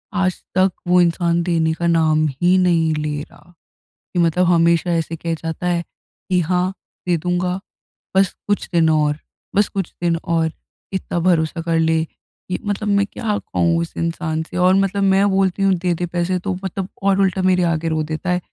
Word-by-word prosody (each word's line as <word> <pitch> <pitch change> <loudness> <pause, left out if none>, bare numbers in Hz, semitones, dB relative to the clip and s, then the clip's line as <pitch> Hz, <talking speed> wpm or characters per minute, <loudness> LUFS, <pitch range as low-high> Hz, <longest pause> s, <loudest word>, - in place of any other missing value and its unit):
आज 185 -2 +1 0.2
तक 190 0 +4 0.2
वो 180 0 +5
इंसान 170 0 +1
देने 165 -2 +1
का 170 +1 -2
नाम 155 -2 +3
ही 180 +1 +4
नहीं 170 -3 +2
ले 150 -1 -2
रहा 175 +3 -15 0.6
कि - - 0
मतलब 170 +2 +2
हमेशा 170 0 +3
ऐसे 165 0 -1
कह 165 +1 -3
जाता 165 +2 -5
है 175 -1 +1
कि 180 +1 -5
हाँ 180 +2 +1 0.4
दे, 175 - +3
दूँगा। 180 +2 -1 0.6
बस 195 -1 +4 0.2
कुछ 205 - 0
दिन 165 -1 +4
और 150 -1 +2 0.4
बस 205 0 +4
कुछ 195 -3 -4
दिन 170 -1 +2
और, 165 -2 +1 0.4
इतना 190 -2 -2
भरोसा 165 -2 +1
कर 165 0 0
ले। 160 0 +2 0.4
कि 180 - -2
मतलब 205 +1 -2
मैं 200 0 +2
क्या 210 -3 -2
कहूँ 170 -1 0
उस 170 - -4
इंसान 165 -1 -2
से 160 - -9
और 185 +1 +5
मतलब 195 +1 +1
मैं 195 +1 +4
बोलती 195 0 +1
हूँ 195 -1 +4
देदे 175 0 0
पैसे 175 +1 -1
तो 190 +1 -3
मतलब 190 0 -3
और 195 0 +3
उल्टा 190 -1 +1
मेरे 185 -1 +3
आगे 165 0 -1
रो 160 -1 0
देता 170 +3 -3
है, 180 - +2
175 Hz, 190 wpm, -20 LUFS, 165-185 Hz, 0.6 s, वो